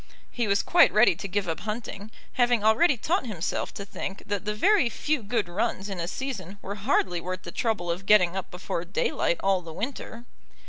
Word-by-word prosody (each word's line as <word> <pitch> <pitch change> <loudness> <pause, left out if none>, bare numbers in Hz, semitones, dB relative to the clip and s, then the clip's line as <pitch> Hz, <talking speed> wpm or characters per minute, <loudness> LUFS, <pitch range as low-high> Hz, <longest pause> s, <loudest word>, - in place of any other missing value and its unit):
He 235 -2 -1
was 200 0 +2
quite 345 0 +5
ready 215 -1 +5
to 200 - -6
give 195 0 -1
up 165 - -2
hunting, 215 0 -5 0.2
having 240 -3 +2
already 240 +7 +4
taught 320 - 0
himself 190 -6 -3
to 200 - -6
think 195 0 -6
that 205 -1 -3
the 210 0 -1
very 385 - +4
few 295 +4 -1
good 215 -1 -1
runs 200 +2 -2
in 195 -2 -5
a 170 - -2
season 200 -5 -5
were 200 - -4
hardly 195 -5 0
worth 185 +1 -5
the 170 - -7
trouble 195 -7 -1
of 185 +3 -5
getting 185 -4 +5
up 190 - -4
before 180 -1 -4
daylight 175 -1 0
all 195 -1 +2
the 165 -2 -9
winter. 230 - -6
205 Hz, 200 wpm, -26 LUFS, 185-235 Hz, 0.2 s, quite